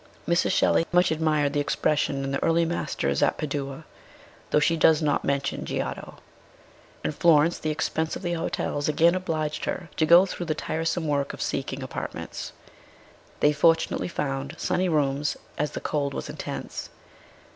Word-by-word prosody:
Mrs. 170 +1 +2
Shelley 165 - +3
much 180 0 +4
admired 155 -2 +1
the 145 - +1
expression 145 -1 0
in 135 - -3
the 140 - -1
early 165 0 +3
masters 70 - -1
at - - +2
Padua, 140 0 -4 0.6
though - - +4
she 165 +3 +2
does 160 -1 +5
not 150 -2 +1
mention 140 0 -1
Giotto. - - -4 0.9
In - - +1
Florence, 160 +1 +4
the 155 - -2
expense 160 +1 -1
of - - -7
the 175 -1 -1
hotels 150 -3 -2
again 165 +3 +4
obliged 160 -5 -2
her 170 -4 -4
to 160 - +3
go 170 +4 +8
through 180 -2 -5
the 155 - 0
tiresome 160 +1 -2
work 140 -1 0
of - - -8
seek 135 - -2
ing 135 0 -5
apartments. 130 - -6 0.9
They 150 - +5
fortunately 165 +2 +2
found 135 -5 -3
sunny 185 0 0
rooms, 145 -2 0 0.2
as 150 0 -1
the - - -3
cold 140 -2 -2
was - - -5
intense. - - -6
155 Hz, 165 wpm, -26 LUFS, 145-165 Hz, 0.9 s, go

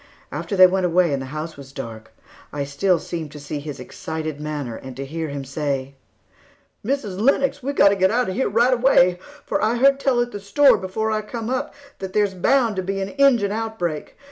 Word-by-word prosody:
After 205 - -4
they 185 -1 +9
went 185 0 +2
away 175 -2 +2
and 135 - -1
the 130 - -6
house 155 +3 -6
was 135 -1 -11
dark, 115 -5 -8 0.4
I 145 -1 -3
still 145 +7 +1
seemed 160 -2 -6
to 150 - -9
see 145 +1 -5
his 145 -2 -7
excited 155 +3 -5
manner 145 -6 -4
and 130 +1 -9
to 135 - -4
hear 160 +3 -4
him 140 -1 -5
say: 140 -1 -3 0.9
"Mrs. 215 -6 -2
Lennox, 275 +3 +2
we've 280 +2 -3
got 200 - +6
to 200 - +2
get 190 -1 +3
out 245 +3 +1
of 185 - -2
here 265 +7 0
right 235 +5 +3
away, 210 -8 +4 0.3
for - - -1
I 220 +2 +2
heard 275 +3 +4
tell 270 -3 +2
at 240 0 0
the 205 - -6
store 245 +4 +4
before 220 +4 -2
I 215 0 0
come 225 +2 -5
up 260 +2 -2 0.2
that 190 -1 -6
there's 205 -2 +2
bound 225 +3 +2
to - - +1
be 195 +1 -3
an 195 0 -3
Injun 260 -7 +3
outbreak. 210 -8 -3
190 Hz, 220 wpm, -22 LUFS, 150-230 Hz, 0.9 s, they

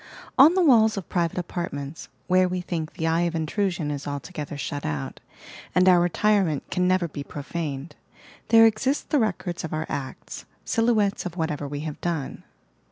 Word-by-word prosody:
On 305 +6 +7
the 375 - +4
walla 230 -8 +6
of 195 - -6
private 170 -2 0
apartments, 165 -4 -5 0.2
where 185 0 +4
we 180 0 -2
think 165 -3 -4
the 160 - -3
eye 165 +1 +2
of 170 -1 0
intrusion 165 -1 -1
is 145 -1 -5
altogether 145 +1 -5
shut 145 0 -4
out, 70 -3 -4 0.6
and 185 +1 +5
our 180 -1 +7
retire 200 +4 +3
ment 155 -5 -2
can 180 0 +1
never 185 -1 +2
be 145 -2 -6
profaned, 145 0 -5 0.5
there 225 0 +7
exist 255 +6 +1
the 300 - +4
records 200 -6 -2
of 160 - -5
our 155 +1 -2
acts, 130 -2 -6 0.2
silhouettes 220 -5 +1
of 175 0 -9
whatever 150 -3 -2
we 145 +1 -5
have 155 -1 -6
done. 165 -6 -3
170 Hz, 175 wpm, -25 LUFS, 150-195 Hz, 0.6 s, On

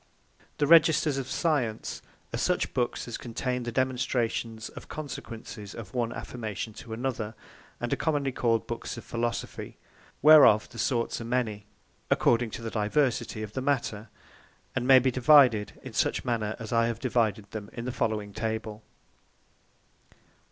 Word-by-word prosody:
The 145 - +2
Registers 155 -2 +5
of 130 -1 -5
Science, 135 -10 -1 0.3
are - - -1
such - - 0
Books 120 0 -1
as 120 - -5
contain 125 +1 -3
the 120 0 -4
Demonstrations 120 -3 -1
of - - -11
Consequences 115 -8 -7
of 105 -5 -9
one 120 -2 0
Affirmation, 110 -3 -5
to 115 - -11
another; 110 -2 -3 0.4
and - - -2
are - - 0
commonly 145 -4 0
called 115 -3 +1
Books 115 0 -5
of 120 - -8
Philosophy; 120 0 -4 0.5
whereof 145 -9 +8
the 115 - -10
sorts 120 -1 0
are - - -5
many, 115 -4 -2 0.4
according 120 0 +3
to 115 - -7
the 115 - -4
diversity 110 0 0
of 105 -1 -7
the 130 - -2
Matter; 120 -6 -1 0.7
And 125 -1 -1
may 135 -1 +9
be 130 0 +3
divided 125 -5 +5
in - - -8
such - - 0
manner 110 -3 -1
as 115 0 -6
I 115 0 +3
have 115 - -2
divided 110 -5 0
them 105 -2 -6
in 115 - -6
the 125 - -2
following 110 -4 -2
Table. 110 -1 -3
120 Hz, 155 wpm, -28 LUFS, 110-130 Hz, 0.7 s, may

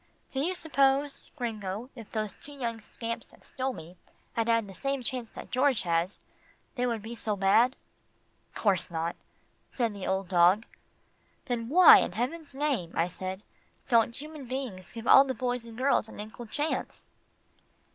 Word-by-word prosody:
Do 265 - -2
you 350 +7 0
suppose, 280 -3 +1
Gringo, 225 -2 -4
if 230 -5 -11
those 215 -2 -3
two 290 - -11
young 235 -5 -3
scamps 230 +2 -6
that - - -21
stole 265 +1 -2
me 175 -6 -11 0.4
had 230 -2 0
had 230 -1 +3
the 195 - -10
same 275 +5 -2
chance 240 -2 -2
that - - -10
George 255 -1 +2
has, 170 +2 0 0.5
they 250 -2 0
would 230 -3 -2
be 225 +2 -6
so 220 -2 -2
bad?" 220 +7 +4 0.8
"'Course 195 -5 +2
not," 165 0 -2 0.6
said 235 -4 0
the 200 -2 -6
old 190 0 0
dog. 180 +5 +4 0.8
"Then 240 -4 -2
why 350 +3 +9
in - - -1
heaven's 275 - -3
name," 270 - -1
I 170 +2 +1
said, 185 +2 -5 0.5
"don't 235 -1 +4
human 300 0 -8
beings 245 -8 -5
give 230 -1 -7
all 270 - +9
the 265 -2 -3
boys 245 -2 -2
and 225 -1 -11
girls 255 -4 +2
an - - -11
equal 220 +3 -8
chance?" 295 +7 -3
235 Hz, 165 wpm, -29 LUFS, 205-270 Hz, 0.8 s, why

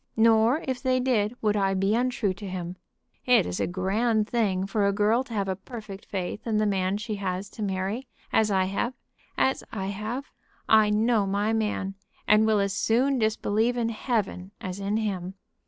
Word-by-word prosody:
Nor, 225 +5 +4
if 260 -1 -2
they 255 -1 +2
did, 240 -3 +1
would 210 -1 +2
I 195 -1 +1
be 195 +2 +1
untrue 245 -4 +1
to 200 +1 -8
him. 180 -1 -5 0.5
It 250 -1 +5
is 90 0 -3
a - - +1
grand 210 +5 +1
thing 200 -6 0
for 200 0 +1
a - - +3
girl 215 +5 +2
to 245 - -9
have 200 -2 0
a 190 - -1
perfect 205 0 -9
faith 190 +3 -4
in 220 -2 +1
the 215 - +2
man 190 -1 +1
she 210 0 -4
has 190 0 -3
to - - -9
marry, 200 +5 -2 0.3
as 220 -1 +4
I 190 -2 +3
have 200 +7 -2 0.4
as 265 - +1
I 195 -3 -3
have. 220 +7 -4 0.4
I 215 -1 +6
know 215 0 +2
my 205 +3 0
man, 210 -3 -1 0.3
and 215 +1 +5
will 215 -1 +3
as 200 -1 0
soon 245 +6 +2
disbelieve 220 +2 +1
in 230 -1 0
Heaven 215 -5 -2
as 185 0 -5
in 200 +2 -1
him. 190 -4 -3
210 Hz, 190 wpm, -26 LUFS, 195-230 Hz, 0.5 s, I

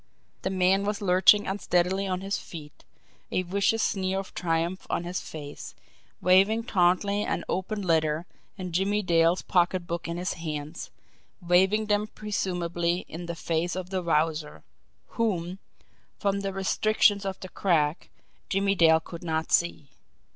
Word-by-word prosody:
The - - -1
man 190 +1 +2
was 205 0 -1
lurching 195 +2 +5
unsteadily 190 0 0
on 185 -1 -2
his 195 0 -2
feet, 150 -3 -11 0.5
a 185 - 0
vicious 200 +5 +1
sneer 190 -1 0
of 195 -1 -5
triumph 170 +1 -1
on - - -1
his 175 +1 -3
face, 145 -2 -9 0.5
waving 195 +5 +4
tauntingly 200 0 +2
an - - -2
open 200 +2 -2
letter 160 -2 +1 0.3
and 185 -2 -6
Jimmie 200 +4 +1
Dale's 170 0 +3
pocket 180 0 +1
book 170 0 -4
in 170 0 -3
his 180 +1 -2
hands 155 -1 -6 0.5
waving 190 +4 +3
them 210 0 +1
presumably 180 -5 -2
in 170 +2 -7
the 170 - -4
face 165 +2 -1
of 185 0 -5
the 190 -1 -1
Wowzer, 160 -2 -1 0.6
whom, 185 -5 -1 0.6
from 200 0 0
the 195 0 -3
restrictions 200 +1 +2
of 190 -1 -4
the 185 - -8
crack, 160 -5 0 0.4
Jimmie 195 0 +2
Dale 160 -3 +5
could 170 +2 -10
not 160 -1 -2
see. 170 -5 +1
180 Hz, 145 wpm, -27 LUFS, 170-195 Hz, 0.6 s, lurching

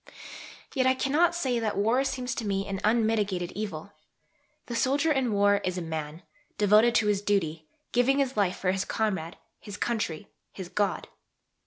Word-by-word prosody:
Yet 260 -2 +2
I 260 - +4
cannot 310 +7 +2
say 260 -8 0
that 220 -3 -2
war 225 +6 +2
seems 255 -2 -3
to 240 - -4
me 195 0 -1
an 195 -1 -3
unmitigated 210 -5 +1
evil. 200 -3 -6 0.7
The 240 - -5
soldier 280 +6 +2
in 265 -5 +1
war 205 0 +4
is 185 0 -2
a - - -2
man: 160 0 -5 0.3
devoted 210 +3 +4
to 225 - +3
his 205 -1 +1
duty, 165 -7 -1 0.2
giving 250 +3 +3
his 270 -2 0
life 195 -3 +1
for 185 - 0
his 195 0 -1
comrade, 190 -8 -2 0.2
his 205 -1 -9
country, 210 -7 -2 0.3
his 185 -3 -8
God. 200 -5 -1
210 Hz, 170 wpm, -27 LUFS, 190-245 Hz, 0.7 s, I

